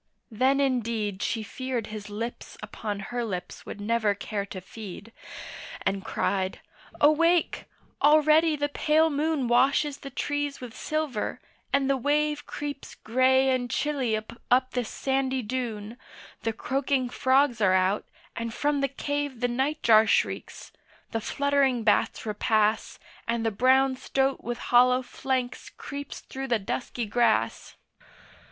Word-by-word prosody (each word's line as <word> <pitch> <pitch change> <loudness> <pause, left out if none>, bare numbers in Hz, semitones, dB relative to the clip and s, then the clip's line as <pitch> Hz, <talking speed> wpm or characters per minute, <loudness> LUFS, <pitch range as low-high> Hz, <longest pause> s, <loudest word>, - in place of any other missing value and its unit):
then 260 +5 +2
indeed 230 -7 0
She 225 -1 -1
feared 250 +1 -4
his 210 -1 -7
lips 230 +3 -6
upon 205 -2 -5
her 245 -1 -1
lips 185 -6 -6
would - - -7
never 215 -1 +1
care 200 0 -4
to 190 - -7
feed, 205 +2 -10 0.7
And 195 0 0
cried, 190 -1 -1 0.4
'Awake, 335 +3 +3 0.4
already 310 +2 +5
the 290 0 0
pale 315 +2 +2
moon 295 -2 0
Washes 275 +4 +3
the 275 - -8
trees 290 +1 -2
with 245 -3 -9
silver, 305 -8 -2 0.3
and 275 -1 +2
the 275 0 +2
wave 295 +3 0
Creeps 290 -1 -6
grey 260 +3 +3
and 250 -1 0
chilly 265 -5 0
up 245 +4 0
this 245 -3 -2
sandy 265 -1 -1
dune, 225 -2 -4 0.4
The 225 - 0
croaking 265 +1 -1
frogs 260 -2 +2
are 190 -2 +4
out, 190 +2 +1 0.3
and 230 0 -3
from 290 +4 0
the 275 - +2
cave 285 -1 -3
The 245 - +1
nightjar 240 -4 +3
shrieks, - - -1 0.4
the 225 - -2
fluttering 275 -1 +1
bats 215 +1 +2
repass, 215 0 +1 0.3
And 230 -1 -1
the 225 - +2
brown 260 +4 +3
stoat 270 +1 0
with 240 0 -3 0.2
hollow 250 +1 +6
flanks 255 0 -3
creeps 285 -1 -8
through 270 0 -6
the 240 -3 +2
dusky 235 +3 -3
grass. 235 +3 +1
255 Hz, 135 wpm, -27 LUFS, 225-280 Hz, 0.7 s, hollow